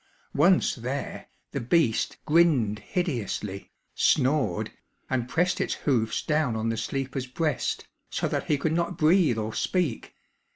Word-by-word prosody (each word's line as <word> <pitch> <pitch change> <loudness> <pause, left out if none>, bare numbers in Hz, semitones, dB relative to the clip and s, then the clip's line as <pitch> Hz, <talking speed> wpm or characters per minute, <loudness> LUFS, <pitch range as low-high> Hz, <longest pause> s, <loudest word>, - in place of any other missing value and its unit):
Once 175 +6 +4
there, 125 +4 -4 0.2
the - - -2
beast 120 -2 +1
grinned 150 -10 +3
hideously, 115 - -3 0.2
snored, 130 - +2 0.4
and 125 -2 0
pressed 175 +5 +1
its - - -1
hoofs 115 -6 0
down 150 -6 +1
on 110 +1 -1
the 115 - 0
sleeper's 135 +3 -3
breast, 150 +2 -2 0.2
so - - -1
that - - -2
he 150 - +2
could 155 +3 0
not 170 +1 -1
breathe 155 - +4
or 110 0 -3
speak. 170 -11 -1
135 Hz, 135 wpm, -27 LUFS, 115-165 Hz, 0.4 s, Once